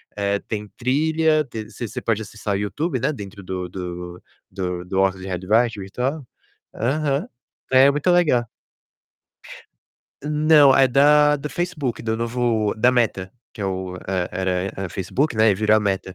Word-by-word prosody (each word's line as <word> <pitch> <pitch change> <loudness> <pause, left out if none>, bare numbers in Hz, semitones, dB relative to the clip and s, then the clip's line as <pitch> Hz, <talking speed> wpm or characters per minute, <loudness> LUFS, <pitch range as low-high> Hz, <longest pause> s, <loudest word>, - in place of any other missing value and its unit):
eh, 100 0 0
tem 105 -1 -4
trilha, 155 +4 +2
tem 110 -4 -7
você 120 0 -6
você 125 +4 -6
pode 110 -2 0
acessar 105 -1 -5
o - - 0
YouTube, 130 - -2
né, 135 - 0
dentro 100 -7 -9
do 90 -1 -4
do 90 -1 -7 0.3
do 90 -2 -4
do 95 +1 -2
óculos 95 -1 +1
de 95 - -7
realidade 105 +5 +1
virtual. 125 +9 -3 0.5
Aham, 145 - -1 0.4
é 130 +2 +7
muito 145 +5 0
legal. 150 -10 +3 1.8
Não, 150 -1 +5
é 135 - +6
da 150 +3 +5
do 145 +1 -6
Facebook, 155 -8 -3
do 110 -1 -1
novo 115 -2 0
da 120 +3 +4
Meta. 105 -6 0 0.2
Que 110 - -7
é - - -1
o 95 -1 -4
e - - -10 0.3
era 95 0 -2 0.3
era 95 -1 -4
Facebook, 100 - -1
né, 110 0 +5
e - - +2
virou 110 +2 +3
a - - +2
Meta. 95 -2 -2
115 Hz, 165 wpm, -22 LUFS, 95-140 Hz, 1.8 s, é